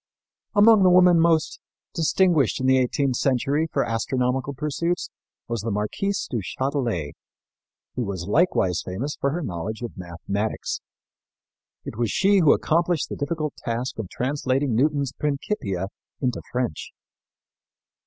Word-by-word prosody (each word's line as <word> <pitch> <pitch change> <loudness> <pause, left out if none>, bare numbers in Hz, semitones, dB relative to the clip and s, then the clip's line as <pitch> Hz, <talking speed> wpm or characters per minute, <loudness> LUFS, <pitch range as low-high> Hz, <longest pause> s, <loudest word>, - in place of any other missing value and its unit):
Among 210 0 +7
the 185 - +6
women 180 -1 +6
most 165 -2 +2 0.3
distinguished 165 - +2
in 130 - -2
the 130 0 +5
eighteenth 130 0 0
century 140 +4 +1
for 140 - +1
astronomical 125 +4 -1
pursuits 155 +5 -2 0.4
was 115 -3 -2
the 115 - -3
Marquise 110 - -2
du 115 - -2
Châtelet, 120 - -2 0.8
who - - -3
was 95 -5 -4
likewise 100 - +2
famous 125 +11 -4
for 140 - +2
her 165 +4 -3
knowledge 105 - -4
of 120 - -6
mathematics. 95 +4 -4 1.0
It - - -7
was 120 -2 +1
she 195 - +3
who 155 -5 +6
accomplished 170 0 +1
the - - -4
difficult 155 0 -2
task 120 +1 -3
of 100 -5 -4
translating 135 0 -1
Newton's 140 +2 +1
Principia 135 - -2 0.3
into 125 -3 -1
French. 125 -11 -2
135 Hz, 135 wpm, -24 LUFS, 110-155 Hz, 1.0 s, Among